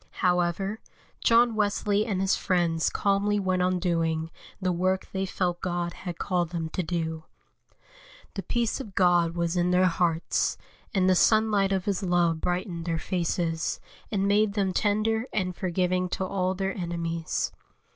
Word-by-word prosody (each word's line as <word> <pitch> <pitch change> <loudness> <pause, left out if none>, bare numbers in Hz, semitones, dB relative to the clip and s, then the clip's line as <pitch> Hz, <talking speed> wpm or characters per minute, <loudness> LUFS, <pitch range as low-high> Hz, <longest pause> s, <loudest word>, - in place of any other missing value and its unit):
However, 180 +4 +1 0.4
John 235 0 +5
Wesley 210 0 +1
and 195 -4 -1
his 195 +1 +2
friends 170 -3 +1
calmly 205 +1 +1
went 185 -2 0
on 180 0 +2
doing 165 -2 0 0.3
the 185 -2 0
work 185 +2 0
they 190 0 -2
felt 180 -2 -1
God 175 -1 -2
had 175 -3 -7
called 175 -3 0
them 165 -2 -3
to 185 - -2
do. 160 -2 -3 1.1
The 195 - -4
peace 235 +6 -1
of 215 -8 -8
God 175 -2 +3
was 170 0 -1
in 175 0 +2
their 180 +1 +4
hearts, 170 -2 +1 0.3
and 190 -3 +2
the 185 - +5
sunlight 210 0 +3
of 190 -2 0
His 200 -3 0
love 175 -3 +1
brightened 175 -2 -2
their 165 -1 -1
faces, 170 -1 -1 0.3
and 200 -2 +1
made 205 0 +3
them 195 -3 0
tender 220 +4 +1
and 185 -3 -1
forgiving 180 0 0
to 190 - -2
all 185 0 -1
their 195 0 -2
enemies. 170 -2 -2
185 Hz, 155 wpm, -27 LUFS, 170-200 Hz, 1.1 s, John